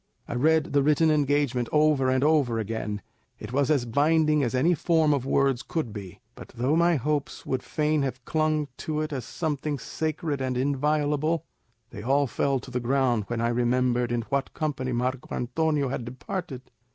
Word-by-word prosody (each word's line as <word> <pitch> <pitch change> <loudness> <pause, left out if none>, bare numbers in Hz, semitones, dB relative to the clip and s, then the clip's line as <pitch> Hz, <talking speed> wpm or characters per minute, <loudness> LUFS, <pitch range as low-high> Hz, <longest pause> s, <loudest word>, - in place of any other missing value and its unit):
I - - -4
read 155 +5 +2
the 140 - +4
written 150 +3 +3
engagement 145 -5 +1
over 150 -3 +3
and 130 +1 +2
over 145 -6 +3
again; 105 -2 -3 0.3
it 105 +3 -8
was 140 +1 +2
as 140 -5 +2
binding 150 +4 +3
as 125 -1 0
any 160 +8 +3
form 160 -1 +2
of 135 -2 -2
words 135 -2 +2
could 135 -6 -3
be; 100 -4 -8
but - - -11
though 130 +6 +1
my 170 +1 +4
hopes 145 +1 -2
would 130 -1 -1
fain 155 -1 0
have 130 -2 -3
clung 155 -1 0
to 155 -1 -2
it 155 0 -3
as 130 -5 -4
something 150 -2 -2
sacred 155 0 -3
and 130 -1 -1
inviolable, 150 +3 0 0.5
they 105 - -8
all 140 +5 +2
fell 135 +2 0
to 130 - -11
the 125 - -1
ground 120 -3 +1
when 120 -1 -2
I 115 - +1
remembered 120 0 +1
in 120 -1 0
what 140 +3 -2
company 135 -5 -2
Marco 125 +2 -2
Antonio 145 +2 0
had 125 - -3
departed. 130 +3 -6
140 Hz, 180 wpm, -26 LUFS, 125-155 Hz, 0.5 s, the